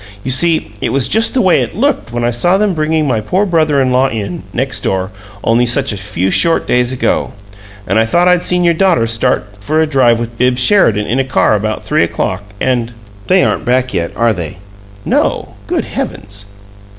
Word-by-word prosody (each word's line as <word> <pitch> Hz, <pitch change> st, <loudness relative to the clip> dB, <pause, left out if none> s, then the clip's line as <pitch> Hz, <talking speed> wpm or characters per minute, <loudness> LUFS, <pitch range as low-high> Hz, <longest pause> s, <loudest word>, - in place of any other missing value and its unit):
You 130 Hz, -, -2 dB
see, 160 Hz, -3 st, +1 dB
it -, -, -1 dB
was 135 Hz, -2 st, +1 dB
just 225 Hz, +3 st, +1 dB
the 255 Hz, -, +2 dB
way 185 Hz, -2 st, +3 dB
it -, -, -4 dB
looked 275 Hz, -, -1 dB
when 120 Hz, 0 st, -3 dB
I 120 Hz, -, +1 dB
saw 175 Hz, +11 st, +1 dB
them 205 Hz, -1 st, +1 dB
bringing 155 Hz, -1 st, 0 dB
my 115 Hz, -5 st, 0 dB
poor 185 Hz, -, 0 dB
brother 155 Hz, -6 st, +1 dB
in 130 Hz, -1 st, +1 dB
law 130 Hz, +2 st, +3 dB
in, 100 Hz, -6 st, -5 dB
next -, -, -2 dB
door, 95 Hz, +1 st, -2 dB, 0.3 s
only 120 Hz, +2 st, +2 dB
such 135 Hz, 0 st, 0 dB
a -, -, -4 dB
few 95 Hz, -1 st, -2 dB
short 165 Hz, -1 st, +2 dB
days 125 Hz, 0 st, +1 dB
ago. 130 Hz, -, -1 dB, 0.5 s
And 100 Hz, +4 st, +1 dB
I 110 Hz, -, +3 dB
thought 175 Hz, +9 st, +2 dB
I'd 180 Hz, -1 st, +3 dB
seen 180 Hz, 0 st, 0 dB
your 170 Hz, -1 st, +3 dB
daughter 170 Hz, -9 st, +2 dB
start 115 Hz, 0 st, 0 dB
for 155 Hz, +10 st, -1 dB
a 160 Hz, -, +3 dB
drive 130 Hz, -6 st, +2 dB
with 115 Hz, 0 st, -6 dB
Bibbs 125 Hz, 0 st, +3 dB
Sheridan 115 Hz, -, +3 dB
in 120 Hz, +5 st, -1 dB
a -, -, +2 dB
car 130 Hz, -4 st, +1 dB
about 110 Hz, +1 st, -2 dB
three -, -, +1 dB
o'clock 95 Hz, +2 st, -2 dB, 0.2 s
and 120 Hz, -2 st, -1 dB, 0.3 s
They 185 Hz, 0 st, +4 dB
aren't -, -, 0 dB
back 130 Hz, +1 st, 0 dB
yet, 85 Hz, 0 st, -2 dB
are 115 Hz, 0 st, +2 dB
they?" 85 Hz, -2 st, -6 dB, 0.5 s
"No. -, -, -1 dB
Good -, -, -1 dB
heavens!" 100 Hz, 0 st, -6 dB
125 Hz, 210 wpm, -14 LUFS, 110-160 Hz, 0.5 s, They